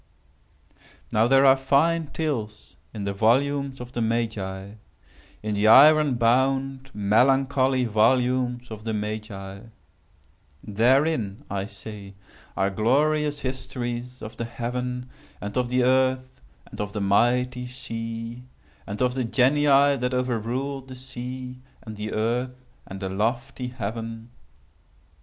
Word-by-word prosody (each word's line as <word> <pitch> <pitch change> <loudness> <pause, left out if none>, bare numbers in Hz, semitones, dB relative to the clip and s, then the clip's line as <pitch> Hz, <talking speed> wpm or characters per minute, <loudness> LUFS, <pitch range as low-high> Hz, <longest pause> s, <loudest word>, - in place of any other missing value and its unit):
Now 110 +2 +3
there 135 +2 +5
are 135 0 +8
fine 150 +5 +2
tales 140 -9 -4 0.2
in 105 -3 -6
the 100 0 -2
volumes 135 +6 +1
of 125 0 -8
the 120 - -3
Magi—in 110 -4 -2 0.8
the 105 +1 +2
iron 145 +3 +7
bound, 130 +3 +1
melancholy 130 +5 +3
volumes 125 +2 +1
of 110 -1 -8
the 110 -1 -2
Magi. 105 -2 -5 1.0
Therein, 120 0 +1
I 100 0 -2
say, 105 -3 -10 0.4
are 100 0 +1
glorious 145 +7 +1
histories 125 -1 -5
of 110 - -8
the 115 - -3
Heaven, 125 +1 -4 0.3
and 100 0 -6
of 125 -1 0
the 125 0 +2
Earth, 130 0 +1 0.2
and - - -8
of 105 0 -4
the 105 - -3
mighty 125 +5 +2
sea—and 115 -2 -7
of 125 0 +1
the 130 0 -1
Genii 140 +3 +4
that 125 0 -1
over 125 -2 0
ruled 135 +4 -4
the 130 - -9
sea, 125 0 -7 0.2
and 110 -2 -8
the 105 +1 -5
earth, 125 +3 -2 0.2
and 95 +1 -8
the 95 - -3
lofty 120 +6 -2
heaven. 115 -1 -6
125 Hz, 125 wpm, -25 LUFS, 110-130 Hz, 1.0 s, are